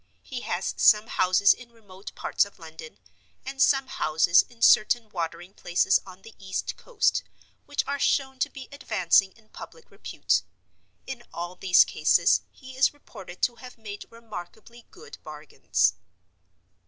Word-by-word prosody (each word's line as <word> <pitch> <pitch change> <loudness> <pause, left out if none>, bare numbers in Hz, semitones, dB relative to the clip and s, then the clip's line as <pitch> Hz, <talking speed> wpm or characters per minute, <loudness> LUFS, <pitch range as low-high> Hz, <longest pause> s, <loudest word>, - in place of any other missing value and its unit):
He 255 - -6
has 175 -3 -3
some 210 0 +5
houses 185 -1 +3
in 245 -2 -15
remote 200 -4 -13
parts - - +1
of 200 - -11
London, 160 - -12 0.5
and 270 0 -5
some 270 -1 +4
houses 160 -7 +3
in 235 -1 -10
certain 220 +1 +4
watering 175 0 -5
places 175 +1 +1
on 185 +1 -14
the 225 - -13
east 190 0 -4
coast, 480 -4 0 0.5
which 290 0 -1
are 280 0 -3
shown 265 -1 0
to - - 0
be 265 - -11
advancing 190 -8 +1
in 220 -2 -25
public 475 - -13
repute. - - -1 0.6
In 265 -2 -7
all 175 +1 -6
these 180 -1 +5
cases - - +3
he 260 -1 -14
is 265 +2 +2
reported 185 -10 -13
to 240 -1 +1
have 250 +1 -12
made 210 -2 -9
remarkably 230 +1 -11
good 450 +5 -14
bargains. - - -1
215 Hz, 150 wpm, -26 LUFS, 185-260 Hz, 0.6 s, some